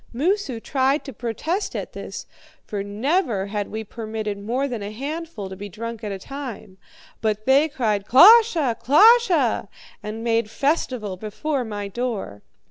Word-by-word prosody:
Moosu 295 - -1
tried 270 +4 0
to 270 - -7
protest 285 - -3
at - - -5
this, - - -7 0.4
for 205 -2 -4
never 220 - 0
had 205 0 -3
we 220 0 -4
permitted 215 -1 -5
more 245 +7 -1
than 240 -5 -4
a 200 - -4
handful 280 - -5
to 190 - -8
be 205 +2 -8
drunk 230 +3 -7
at 210 - -3
a 195 - -4
time; 225 -5 -8 0.4
but 215 -1 -1
they 280 +4 +4
cried, 215 -7 -1
'KLOSHE! 345 - +6
KLOSHE!' 350 - +5 0.3
and 215 +2 -6
made 230 -2 +1
festival 250 - -1
before 255 +8 -3
my 205 -3 -5
door. 200 - -4
230 Hz, 150 wpm, -23 LUFS, 210-280 Hz, 0.4 s, KLOSHE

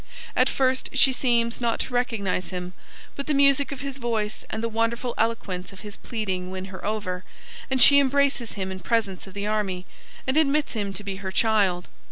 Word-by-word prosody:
At - - +4
first 260 -1 +1
she 270 0 +6
seems 235 -2 +1
not 235 -1 0
to 255 - -5
recognise 220 -7 -1
him, 180 -1 -5 0.4
but 280 - -5
the 300 - +1
music 280 0 +4
of 275 - -6
his 275 -1 -5
voice 220 -3 -1
and 220 - -4
the - - +1
wonderful 230 +2 -1
eloquence 205 -5 -2
of 195 - -13
his 210 -1 -7
pleading 190 -6 -4
win 185 0 -5
her 185 - -8
over, 200 -4 -2 0.5
and 265 -1 +1
she 280 +2 +9
embraces 275 -3 +1
him 190 -2 -4
in 190 - -6
presence 195 0 -1
of 190 - -12
the 200 0 -3
army 200 -4 -1 0.4
and 260 +3 0
admits 300 -1 +2
him 205 -4 -2
to 210 - -5
be 195 -1 -4
her 190 -1 -5
child. 195 -5 +2
220 Hz, 200 wpm, -25 LUFS, 190-255 Hz, 0.5 s, she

